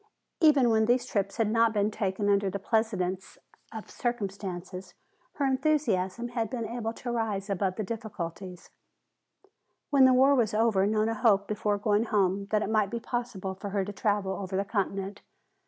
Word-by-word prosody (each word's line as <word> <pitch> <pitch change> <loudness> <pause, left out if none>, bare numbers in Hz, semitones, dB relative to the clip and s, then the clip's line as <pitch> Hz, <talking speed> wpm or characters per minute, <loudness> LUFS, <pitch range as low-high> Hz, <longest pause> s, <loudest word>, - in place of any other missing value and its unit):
Even 285 -7 +5
when 220 0 +3
these 245 +2 +2
trips 200 -4 -2
had 220 -2 +1
not 230 0 +3
been 205 0 +1
taken 200 0 -2
under 200 -1 +2
the 200 - -3
pleasantest 195 -3 -1 0.6
conditions 195 -6 -3 0.5
her 285 - -1
enthusiasm 240 -7 0
had 230 -3 -2
been 240 -3 -3
able 230 0 -3
to 240 +1 -6
rise 215 -4 -2
above 190 -1 -1
the 215 - -3
difficulties. 190 -5 -6 1.2
When 275 -2 +6
the 260 - +6
war 270 +2 +5
was 230 -6 +1
over 215 -3 +3
Nona 215 +1 +1
hoped 205 -3 +2
before 210 -1 -1
going 210 +2 +1
home 200 -2 +1
that 215 0 +1
it - - -3
might 215 -3 +2
be 235 - -3
possible 230 -5 -4
for 200 +2 -7
her 195 -1 -1
to 205 - -6
travel 200 -1 0
over 190 0 -4
the 200 - 0
continent. 200 -1 -3
210 Hz, 170 wpm, -28 LUFS, 195-230 Hz, 1.2 s, When